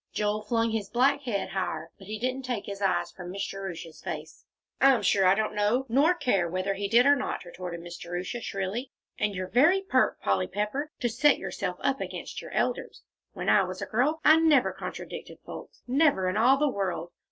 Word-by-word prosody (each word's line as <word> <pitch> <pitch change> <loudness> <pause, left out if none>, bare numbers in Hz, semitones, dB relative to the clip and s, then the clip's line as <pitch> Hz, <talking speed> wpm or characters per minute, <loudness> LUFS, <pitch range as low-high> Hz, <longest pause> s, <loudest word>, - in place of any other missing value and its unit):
Joel 210 0 -1
flung 230 +1 0
his 215 -3 -2
black 270 +4 +3
head 200 -6 -2
higher, 170 -4 -3
but 195 - -13
he 215 +1 -4
didn't 255 +4 -2
take 245 -5 -3
his 200 0 -7
eyes 175 -3 +1
from 180 -1 -9
Miss 195 +2 -3
Jerusha's 185 -4 -7
face. 155 +1 -7 0.4
"I'm 270 -2 +5
sure 195 -2 +4
I 185 - +6
don't 215 +1 -1
know 210 +5 +1
nor 290 +9 +4
care 200 - +1
whether 185 +3 -1
he 200 +1 -3
did 235 +4 +5
or 285 0 +6
not," 260 -8 -3
retorted 175 -1 -7
Miss 175 0 -8
Jerusha, 180 +7 -4
shrilly. 200 +7 -3 0.3
"And 210 -1 0
you're 185 0 -3
very 330 - +4
pert, 260 -9 +2
Polly 95 -2 +1
Pepper, 215 +9 -3
to 240 - +2
set 265 +6 +3
yourself - - -4
up - - 0
against - - -6
your - - -9
elders. - - -2 0.3
When - - -5
I 205 - +6
was 185 0 -5
a - - -3
little - - -21
girl 290 +8 +1
I 310 +1 +8
never 305 -6 +4
contradicted - - -7
folks. - - -10
Never 265 - +3
in 185 - -1
all 245 +5 +5
the 295 +2 +2
world! 185 - -2
210 Hz, 210 wpm, -28 LUFS, 185-255 Hz, 0.4 s, I